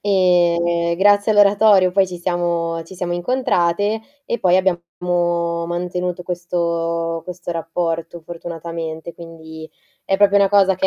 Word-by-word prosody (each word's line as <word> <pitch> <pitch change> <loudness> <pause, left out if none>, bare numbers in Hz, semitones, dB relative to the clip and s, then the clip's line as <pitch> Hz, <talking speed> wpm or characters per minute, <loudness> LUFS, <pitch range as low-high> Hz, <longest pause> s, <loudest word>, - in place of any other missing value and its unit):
e 170 -3 +2
grazie 205 +2 +4
all'oratorio 205 -2 +5
poi 195 +1 +2
ci 180 -1 -8
siamo 170 -2 -1
ci 190 - -12
siamo 175 -1 -3
incontrate. 205 -1 0 0.3
E 235 - -2
poi 185 -2 +3
abbiamo 185 -2 0 0.8
mantenuto 180 +1 -3
questo 170 -1 -2
questo 180 -1 -7
rapporto 165 0 -3
fortunatamente, 165 -1 -7
quindi 160 -1 -11 0.4
è 195 - +1
proprio 205 0 +4
una 200 -1 +4
cosa 195 -1 +4
che 190 - +1
175 Hz, 125 wpm, -19 LUFS, 170-190 Hz, 0.8 s, all'oratorio